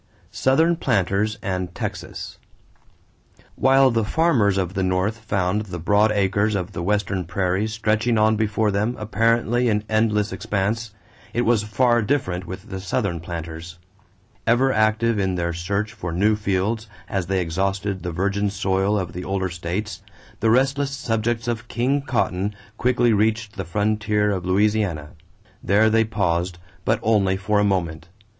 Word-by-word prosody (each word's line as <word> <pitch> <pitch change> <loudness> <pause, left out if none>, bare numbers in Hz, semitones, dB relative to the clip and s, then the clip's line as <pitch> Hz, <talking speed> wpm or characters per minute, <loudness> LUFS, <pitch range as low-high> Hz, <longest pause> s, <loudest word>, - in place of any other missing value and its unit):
=Southern 160 +6 +2
Planters 105 - 0
and 90 -2 -3
Texas.= - - -6 1.2
While 135 0 +5
the 115 -1 +1
farmers 110 - +2
of 95 -1 -1
the 95 - -1
North 95 +4 0
found 100 -1 -1
the 90 -2 -5
broad 105 +5 +3
acres 100 +1 +1
of 95 0 -3
the 85 - -5
Western 95 0 0
prairies 95 +5 -1
stretching 110 +2 +1
on 110 +1 +4
before 110 0 +1
them 105 +5 0
apparently 115 +3 +1
in 105 -1 +1
endless 110 -1 +1
expanse, 110 +2 -2 0.4
it 120 - +2
was 115 -2 +3
far 120 +3 +2
different 95 -7 -1
with 95 +4 -8
the 95 - -4
Southern 95 -2 -1
planters. 85 0 -7 0.7
Ever 130 +3 +3
active 110 +1 +2
in 95 -1 0
their 85 -1 -1
search 100 +5 -2
for 85 - -5
new 105 +6 +2
fields 105 +2 -1 0.2
as 95 -3 -2
they 95 0 +1
exhausted 95 +3 -1
the 85 - -4
virgin 100 +4 0
soil 95 +1 0
of 90 -4 -3
the 90 - -5
older 95 0 -1
states, 90 +5 -4 0.4
the 110 - +2
restless 135 +4 +2
subjects 115 -3 -2
of 115 0 -3
King 130 +5 0
Cotton 105 -7 -1 0.2
quickly 120 -1 +2
reached 110 0 0
the 95 -2 -4
frontier 105 +3 +1
of 90 -2 -3
Louisiana. 95 -6 +1 0.5
There 110 +3 +4
they 115 0 +3
paused; 90 -4 -1 0.3
but 110 +1 +2
only 100 -4 +2
for 100 +2 +1
a - - +3
moment. 85 -5 -1
105 Hz, 150 wpm, -22 LUFS, 95-110 Hz, 1.2 s, While